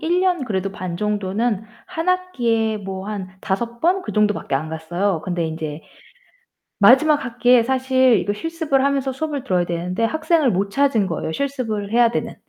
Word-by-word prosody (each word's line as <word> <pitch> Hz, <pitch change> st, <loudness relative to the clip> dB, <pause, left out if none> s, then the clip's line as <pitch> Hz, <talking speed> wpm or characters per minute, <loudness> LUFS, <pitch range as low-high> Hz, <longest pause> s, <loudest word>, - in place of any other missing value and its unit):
1 345 Hz, +3 st, +1 dB
년 360 Hz, -6 st, +1 dB
그래도 195 Hz, -4 st, -2 dB
반 180 Hz, -3 st, -5 dB
정도는 210 Hz, +2 st, -1 dB, 0.2 s
1 330 Hz, 0 st, -4 dB
학기에 240 Hz, -12 st, +1 dB
뭐 190 Hz, -1 st, -6 dB
한 205 Hz, -3 st, -5 dB
5 235 Hz, +5 st, -3 dB
번 365 Hz, +3 st, +2 dB
그 -, -, -6 dB
정도밖에 210 Hz, -8 st, +1 dB
안 150 Hz, +4 st, -1 dB
갔어요. 165 Hz, +3 st, -2 dB
근데 175 Hz, -2 st, -1 dB
인제 160 Hz, -1 st, -5 dB, 1.0 s
마지막 290 Hz, +8 st, +5 dB
학기에 245 Hz, 0 st, +3 dB
사실 260 Hz, -2 st, +3 dB
이거 205 Hz, -, -1 dB
실습을 315 Hz, +2 st, -1 dB
하면서 275 Hz, -1 st, 0 dB
수업을 285 Hz, 0 st, -4 dB
들어야 180 Hz, -9 st, +1 dB
되는데 175 Hz, +5 st, -3 dB
학생을 315 Hz, 0 st, +2 dB
못 195 Hz, +2 st, 0 dB
찾은 235 Hz, -4 st, +2 dB
거예요, 160 Hz, -2 st, -3 dB
실습을 225 Hz, -, -3 dB
해야 235 Hz, 0 st, +4 dB
되는. -, -, -3 dB
225 Hz, 325 characters per minute, -21 LUFS, 190-275 Hz, 1.0 s, 마지막